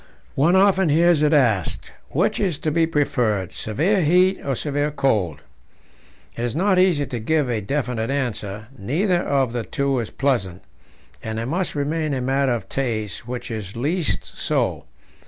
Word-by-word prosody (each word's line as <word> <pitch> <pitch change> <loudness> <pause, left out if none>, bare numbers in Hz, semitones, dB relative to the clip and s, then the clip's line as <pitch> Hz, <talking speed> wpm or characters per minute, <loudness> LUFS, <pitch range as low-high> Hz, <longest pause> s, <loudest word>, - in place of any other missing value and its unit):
One 160 +7 +3
often 190 -2 +4
hears 165 +1 +4
it 150 -1 +3
asked, 120 - +1 0.2
Which - - 0
is 180 -7 0
to 155 - -2
be 165 +1 +2
preferred, 115 - 0
severe 165 - 0
heat 180 +4 +3
or 135 -2 -1
severe 145 +2 -1
cold? 110 - 0 0.9
It 115 - -4
is 120 +1 -2
not 185 +2 +3
easy 175 -6 +3
to 125 -3 -5
give 150 +5 +1
a 110 -2 -1
definite 120 0 -2
answer; 110 -6 -3
neither 175 - 0
of 135 -6 0
the 120 - -1
two 140 +2 -1
is 115 - -3
pleasant, 105 -10 -1 0.6
and 110 0 -4
it 115 - -2
must 175 +7 -2
remain 150 +1 -1
a 130 - -2
matter 135 0 +1
of 110 -5 -6
taste 115 -5 -3
which 125 -1 -5
is 105 -3 -6
least 155 +8 -1
so. - - -1
135 Hz, 165 wpm, -22 LUFS, 115-160 Hz, 0.9 s, often